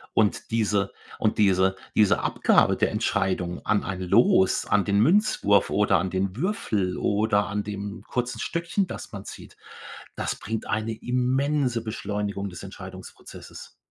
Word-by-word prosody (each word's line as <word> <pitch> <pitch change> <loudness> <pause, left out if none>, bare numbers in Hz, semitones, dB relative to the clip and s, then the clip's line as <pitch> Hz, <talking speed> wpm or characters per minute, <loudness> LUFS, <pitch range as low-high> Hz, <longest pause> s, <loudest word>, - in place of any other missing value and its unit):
Und 105 -2 +1
diese 105 -3 +1 0.3
und 110 - 0
diese 95 -2 +3 0.2
diese 105 -2 +4
Abgabe - - +3
der - - +1
Entscheidung 90 -2 -1
an 105 0 +2
ein 95 -1 -4
Los, 95 0 +3
an 100 -2 +2
den 100 0 +2
Münzwurf 160 - +3
oder 105 -3 +3
an 95 +3 -1
den 95 +1 -2
Würfel 110 - -1
oder 105 0 +1
an 105 +1 -2
dem 100 0 -6
kurzen 125 -1 -3
Stöckchen, 170 - -1
das - - -8
man - - -7
zieht, - - -11 0.6
das - - -3
bringt 110 +3 -5
eine 110 +1 -1
immense 125 +1 0
Beschleunigung 105 -2 -3
des 90 - -9
Entscheidungsprozesses. 95 -1 -11
105 Hz, 140 wpm, -25 LUFS, 95-115 Hz, 0.6 s, diese